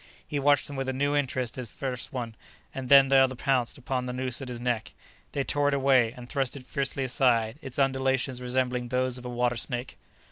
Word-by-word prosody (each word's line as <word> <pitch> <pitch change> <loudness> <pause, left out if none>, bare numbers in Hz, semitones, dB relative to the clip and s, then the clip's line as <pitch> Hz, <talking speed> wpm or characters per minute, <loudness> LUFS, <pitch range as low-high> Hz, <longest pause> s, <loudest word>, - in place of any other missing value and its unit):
He 145 - -2
watched 145 0 +3
them 145 - -7
with 135 0 -2
a - - -1
new 145 +2 0
interest 130 -3 -1
as 120 -3 -5
first 130 +1 -4
one 120 -5 -4 0.4
and 130 -2 -5
then 135 -1 +8
the 135 - +5
other 130 -1 +4
pounced 130 -2 0
upon 125 -1 -3
the 125 - -3
noose 130 0 -2
at 135 - -6
his 125 -1 -5
neck. 120 -2 -2 0.4
They 140 - 0
tore 145 +1 +1
it 145 - +2
away 130 -4 +4
and 125 -1 -10
thrust 135 -1 -1
it 135 - -8
fiercely 135 +1 -2
aside, 125 -2 +1
its 135 -3 -7
undulations 130 -1 +1
resembling 125 0 0
those 130 0 -1
of 125 - -12
a - - -4
water 120 0 0
snake. 120 +2 -2
130 Hz, 220 wpm, -27 LUFS, 125-135 Hz, 0.4 s, then